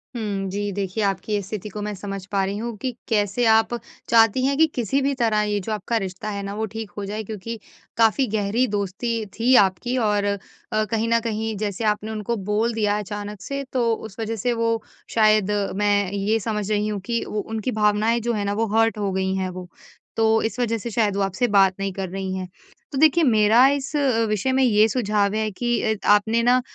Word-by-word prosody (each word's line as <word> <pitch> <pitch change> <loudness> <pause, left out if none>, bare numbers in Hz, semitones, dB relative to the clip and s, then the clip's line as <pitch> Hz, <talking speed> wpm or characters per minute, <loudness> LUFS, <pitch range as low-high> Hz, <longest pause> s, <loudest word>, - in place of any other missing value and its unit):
हुँ 200 -4 -3
जी, 205 +1 -2
देखिए 200 +2 -2
आपकी 200 +1 -1
स्थिति 210 +1 -6
को 210 +1 -6
मैं 210 0 -3
समझ 195 0 -6
पा 200 -1 +1
रही 200 +1 -3
हूँ 230 +1 -4
कि 255 +5 -3 0.2
कैसे 210 +2 +1
आप 225 +2 +3 0.4
चाहती 230 +2 +4
हैं 275 +1 +1
कि 320 +1 +5
किसी 250 +3 0
भी 280 +1 +1
तरह 220 -2 +3
ये 210 -1 0
जो 200 +3 -5
आपका 215 +2 -1
रिश्ता 195 0 -4
है 200 -1 -4
ना 200 0 -5
वो 220 +1 -1
ठीक 220 -2 -6
हो 205 - -3
जाए 210 +2 -4
क्योंकि 215 +2 -6 0.4
काफ़ी 230 +4 +3
गहरी 215 +4 +1
दोस्ती 215 +2 -2
थी 250 +3 +4
आपकी 195 +7 -2
और 210 -4 +1
अ, 200 0 0 0.5
कहीं 225 0 0
न 230 - +4
कहीं 220 -1 -3
जैसे 205 +1 -3
आपने 210 +1 -8
उनको 220 +2 -2 0.2
बोल 225 +3 +1
दिया 210 -2 +1
अचानक 205 0 -6
से 275 +8 -4
तो 240 -3 +2
उस 220 -1 -8
वज़ह 225 0 -2
से 240 +3 0
वो 230 -1 0 0.3
शायद 215 -2 +4 0.2
मैं 205 -1 +1
ये 205 +2 0
समझ 210 -1 -3
रही 210 0 +1
हूँ 210 -1 -2
कि 235 -1 0
वो 210 - -3
उनकी 220 +3 -3
भावनाएँ 215 +2 +2
जो 235 +1 -1
हैं 205 -2 -2
ना 200 - 0
वो - - +3
हर्ट 225 0 +3
हो 200 -2 -1
गई 190 0 -1
हैं 190 -1 -1
वो, 180 0 -8 0.5
तो 225 0 +3
इस 225 +2 -3
वज़ह 230 -2 +1
से 225 +2 -5
शायद 210 -3 +1
वो 200 - 0
आपसे 195 +5 0
बात 195 -1 +5
नहीं 195 0 -2
कर 190 -1 -4
रही 190 0 -4
हैं। 185 -1 -4 0.4
तो 275 - -4
देखिए 315 +3 +5
मेरा 225 -1 +5
इस 280 +1 -1
अ, 260 -6 +2
विषय 215 +5 0
में 265 0 +3
ये 215 -3 +5
सुझाव 210 -3 0
है 215 0 0
कि 240 +4 -1
अ, 220 -1 +1
आपने 220 +3 +4
ना 250 +1 +4
215 Hz, 220 wpm, -23 LUFS, 200-230 Hz, 0.5 s, कि